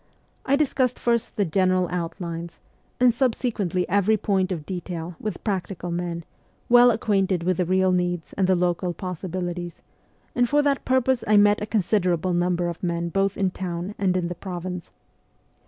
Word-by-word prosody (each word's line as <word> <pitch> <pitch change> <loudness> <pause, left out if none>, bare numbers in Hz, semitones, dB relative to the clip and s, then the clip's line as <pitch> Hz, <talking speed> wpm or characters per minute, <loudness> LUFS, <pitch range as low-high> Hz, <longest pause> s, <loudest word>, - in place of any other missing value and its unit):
I 275 - +4
discussed 260 -4 +1
first 235 -1 0
the 205 - +2
general 185 +1 +2
outlines, 170 -1 -5 0.4
and 245 -1 +5
subsequently 220 -8 0
every 205 +3 +3
point 190 -2 0
of 160 -5 -4
detail, 175 -1 -5
with 215 - -5
practical 190 -3 -3
men, 170 -1 -3 0.4
well 245 0 +8
acquainted 195 -5 +1
with 180 0 +1
the 180 - +1
real 185 +1 +2
needs 175 -2 -1
and 190 -2 +1
the 185 - +4
local 175 0 0
possibilities; 180 -1 -5 0.5
and 245 -1 +2
for 295 0 +3
that 280 -1 0
purpose 260 -1 +2
I 210 0 +5
met 205 0 +5
a 210 - -3
considerable 185 -4 +1
number 175 0 +1
of 170 -1 -5
men 170 -1 -1
both 195 +2 0
in 190 -2 +1
town 180 +1 -4
and 185 -2 +2
in 175 -2 -1
the 175 - -3
province. 180 -1 -6
185 Hz, 165 wpm, -24 LUFS, 175-210 Hz, 0.5 s, well